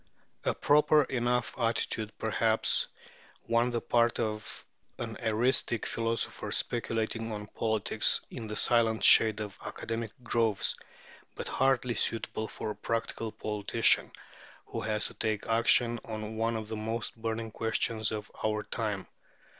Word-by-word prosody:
A - - +1
proper 150 +1 +5
enough 125 -2 0
attitude, 110 -1 0
perhaps, 110 0 +1 0.6
on 115 +1 +3
the 120 -1 -1
part 120 -1 +2
of 110 -1 -4 0.3
an 115 -2 -5
eristic 120 +1 +2
philosopher 115 0 -2
speculating 115 -1 -1
on 105 -1 -5
politics 110 0 +1
in 115 -3 -6
the 105 - -4
silent 115 -1 +3
shade 110 -1 +6
of 105 -2 -6
academic 115 0 -4
groves, 115 -4 +1 0.6
but - - -5
hardly 130 -2 +2
suitable 110 -1 -1
for 110 - -5
a - - -6
practical 115 -1 -3
politician 105 +2 +2 0.5
who - - -5
has 105 -1 -1
to - - -5
take 110 -1 -2
action 115 +1 +3
on 110 0 -5
one 115 +1 0
of 110 -1 -4
the 110 - -4
most 110 +1 -3
burning 115 0 -3
questions 110 0 0
of 105 -1 -5
our 105 -1 0
time. 105 -4 -3
115 Hz, 135 wpm, -30 LUFS, 110-115 Hz, 0.6 s, shade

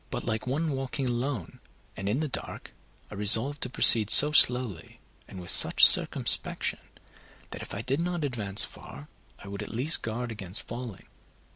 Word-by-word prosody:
But - - -8
like 110 +3 -6
one 155 +5 -4
walking 135 0 -6
alone 125 0 -6 0.4
and 100 0 -7
in 125 +8 -3
the 155 - -4
dark, 130 - -6 0.4
I - - -10
resolved 110 +8 +2
to 125 - -6
proceed 110 -4 +4
so 150 +6 +9
slowly 125 - +1 0.3
and 95 - -13
with 90 - -5
such - - +4
circumspection, - - +1 0.7
that - - -10
if - - -10
I 100 - -8
did 135 +5 -4
not 175 -1 -5
advance 105 -7 0
far, 70 +2 -13 0.3
I - - -16
would 100 0 -9
at - - -9
least 130 +8 -1
guard 115 +2 -7
against 95 -2 -5
falling. 120 -3 -10
120 Hz, 170 wpm, -25 LUFS, 105-135 Hz, 0.7 s, so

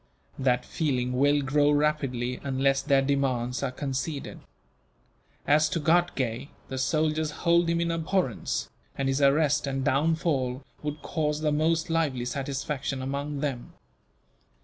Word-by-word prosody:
That 125 -2 +1
feeling 125 -5 -1
will 145 +2 +3
grow 145 +2 +3
rapidly, 140 -5 0
unless 135 0 +1
their 135 -1 +3
demands 130 -3 0
are 140 - 0
conceded. 135 +2 -4 1.1
As 150 +1 +4
to 165 - -1
Ghatgay, 150 -7 +1 0.2
the 130 - -4
soldiers 155 +3 +1 0.2
hold 170 0 +4
him 170 0 +1
in 170 0 0
abhorrence, 165 - -1 0.3
and 135 - 0
his 135 +1 0
arrest 145 0 +3
and 135 0 -2
downfall 140 -3 +1 0.2
would 150 0 -5
cause 150 -2 -1
the 155 -1 +1
most 160 +2 +1
lively 145 -7 0
satisfaction 135 +1 -3
among 140 +2 -3
them. 135 -5 -3
140 Hz, 130 wpm, -27 LUFS, 130-155 Hz, 1.1 s, As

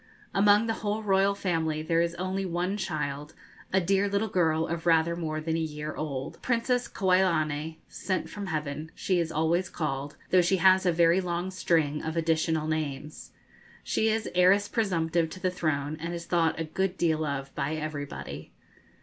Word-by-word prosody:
Among 205 +2 +5
the 225 - 0
whole 210 +1 -1
royal 195 0 +3
family 160 -5 -1
there 165 +1 +2
is 170 0 -1
only 185 +2 -2
one 180 +2 -1
child, 150 -6 -4 0.4
a 190 - +4
dear 195 +2 +2
little 200 +2 0
girl 160 -3 +2
of 170 +1 -4
rather 165 0 +4
more 155 -2 -3
than 160 +1 -2
a - - 0
year 150 -1 -4
old. 140 -4 -5
Princess 245 0 0
Kauilani 160 -6 +1
('Sent 185 -1 -3
from 205 -2 -6
Heaven') 155 -1 -3
she 185 -2 0
is 165 -1 -1
always 165 +4 +1
called, 145 -2 -3
though 185 - +6
she 180 +2 +2
has 185 +1 +5
a - - +5
very 170 +2 +4
long 175 +1 -2
string 160 -5 +1
of 160 +1 -4
additional 160 -1 +1
names. 150 -2 -4 0.5
She 220 - +1
is 220 0 0
heiress 185 +3 +4
presumptive 170 -6 0
to 185 - -9
the 185 0 0
throne, 155 -4 -1
and 170 +2 -4
is 170 0 -6
thought 165 -2 +1
a - - 0
good 185 +4 -2
deal 160 -2 +1
of 140 -2 -3
by 145 +3 -2
everybody. 150 -2 -6
170 Hz, 175 wpm, -28 LUFS, 155-190 Hz, 0.5 s, though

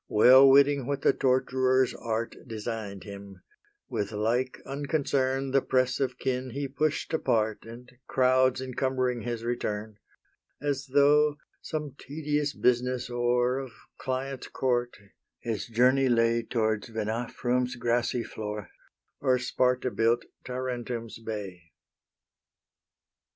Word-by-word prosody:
Well 130 +5 +8
witting 140 -1 +5
what 140 -1 -2
the - - +5
torturer's 130 0 +2
art 115 0 -3
Design'd 110 -3 -5
him, 100 -2 -10 0.4
with 105 0 -3
like 115 +4 0
unconcern 135 -1 -1
The 135 0 +4
press 130 0 +1
of 130 -2 -1
kin 130 -1 -2
he 140 0 -2
push'd 150 +4 -1
apart 110 -9 0
And 120 +2 -11 0.2
crowds 130 0 +3
encumbering 130 -1 -1
his 120 0 -4
return, 110 -3 -3 0.6
As 140 -1 -2
though, 145 +2 +4 0.2
some 150 -3 -4
tedious 150 0 -2
business 125 0 +1
o'er 120 +1 +1
Of 130 -3 -7 0.3
clients' 130 0 -3
court, 120 -2 -1 0.4
his 115 -4 -3
journey 125 +3 +3
lay 115 0 +3
Towards 110 -2 -1
Venafrum's 120 +3 -1
grassy 120 0 0
floor, 105 -2 -6 0.5
Or 130 -2 +2
Sparta 125 0 0
built 115 +1 +1 0.2
Tarentum's 125 -3 -4
bay. 100 -6 -6
125 Hz, 115 wpm, -28 LUFS, 115-130 Hz, 0.6 s, Well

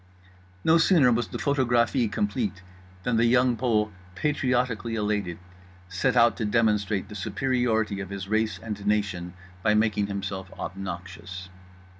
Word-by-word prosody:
No 165 +1 +5
sooner 160 -7 +5
was 120 -1 +1
the - - -5
photographie 120 -4 +2
complete 105 -3 -2 0.4
than 120 -2 +1
The 115 - +4
Young 125 +1 +4
Pole, 110 -3 +1 0.2
patriotically 125 -3 0
elated, 105 -5 -1 0.5
set 95 0 0
out 115 -2 +5
to 110 - -1
demonstrate 105 -3 +1
the 105 - -10
superiority 110 0 0
of 100 -2 -5
his 100 -1 -5
race 110 -1 0
and 105 +1 -6
nation 95 -4 -1 0.3
by 105 +1 +3
making 105 -2 +2
himself 100 -2 -5
obnoxious. 95 0 -6
105 Hz, 135 wpm, -26 LUFS, 100-120 Hz, 0.5 s, No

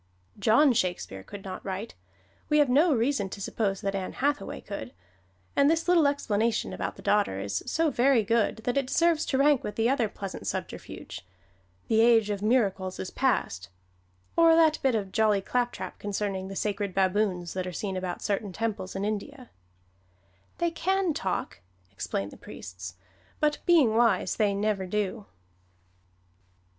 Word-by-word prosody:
John 235 +7 +5
Shakespeare 175 - -2
could 195 - -10
not 185 -1 -7
write, 195 +3 -5 0.6
we 300 - +4
have 295 -3 +4
no 300 +7 +4
reason 240 -4 +1
to 200 - -8
suppose 195 -1 -2
that 195 0 -1
Ann 190 -1 -3
Hathaway 285 +2 -1
could, 160 - -7 0.6
and 280 +1 +5
this 325 +1 +1
little 340 -4 +5
explanation 230 -5 0
about - - -4
the - - -13
daughter 205 - +2
is 100 -1 -2
so 320 -1 +1
very 250 -2 +3
good 225 +1 +1
that 245 +3 -1
it 275 -2 +1
deserves 335 +2 +2
to 265 - +1
rank 280 -1 +4
with 210 - -5
that 225 +1 +2
other 245 -4 +1
pleasant 195 -1 -7
subterfuge, - - -6 0.6
"The 220 0 +3
age 225 -3 +5
of 200 -1 -3
miracles 200 -5 +1
is 185 - -5
past"; 90 - 0 0.7
or 330 -1 +6
that 320 -2 +4
bit 265 -3 +2
of 200 -3 -2
jolly 215 -2 +3
claptrap 245 +5 -3
concerning 200 -2 -3
the 195 - -7
sacred 200 -1 -2
baboons 190 -2 +1
that 185 -1 -3
are - - -4
seen 190 +2 -4
about 185 -1 -4
certain 205 -1 -1
temples 205 -2 -3
in 195 +1 -2
India: 240 +5 -5 1.1
"They 340 0 0
can 375 0 0
talk," 190 - -3 0.3
explain 100 +2 -3
the - - -13
priests, 90 0 -9 0.4
"but 300 -1 +1
being 300 -11 +5
wise 235 0 +3
they 205 -2 +2
never 200 -2 -1
do." 205 +1 -2
215 Hz, 160 wpm, -28 LUFS, 195-270 Hz, 1.1 s, or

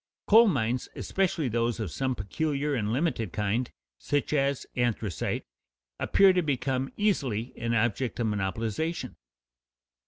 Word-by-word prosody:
Coal 225 +2 +7
mines, 125 - 0
especially 180 -6 0
those 115 0 0
of 105 -7 -3
some 130 -1 -1
peculiar 145 +7 -1
and 110 -5 -1
limited 125 - 0
kind, 105 +6 -1 0.3
such 145 +1 -1
as 140 -2 +1
anthracite, 115 -7 -1 0.5
appear 195 -1 +5
to 180 - +2
become 135 -3 -1
easily 130 - 0
an 115 0 -1
object 120 +2 0
of 120 - +1
monopolization. 110 - -2
125 Hz, 125 wpm, -28 LUFS, 110-145 Hz, 0.5 s, Coal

